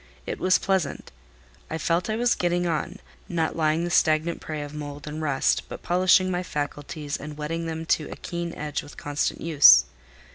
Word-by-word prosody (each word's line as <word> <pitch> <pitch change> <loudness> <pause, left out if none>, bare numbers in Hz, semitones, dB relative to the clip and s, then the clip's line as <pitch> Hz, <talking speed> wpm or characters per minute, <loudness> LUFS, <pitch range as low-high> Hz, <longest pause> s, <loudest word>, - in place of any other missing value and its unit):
It - - -4
was 185 0 +4
pleasant. 190 -6 -1 0.6
I 160 - -3
felt 170 +3 0
I 215 - 0
was 240 +1 +2
getting, 175 0 0
on; 170 +3 -2 0.3
not 165 -2 -1
lying 160 0 +1
the 175 - -2
stagnant 155 +1 +2
prey 155 -2 -5
of 145 0 -9
mould 145 -1 -7
and 155 +1 -5
rust, 140 -4 +1
but - - -8
polishing 185 +1 +3
my 180 0 -1
faculties 145 -2 -4
and 150 0 -8
whetting 165 +2 -3
them 160 0 -4
to 155 -2 0
a - - -7
keen 170 0 -5
edge 150 -1 -3
with 145 - -13
constant 145 0 -2
use. 145 - +7
160 Hz, 185 wpm, -25 LUFS, 150-175 Hz, 0.6 s, use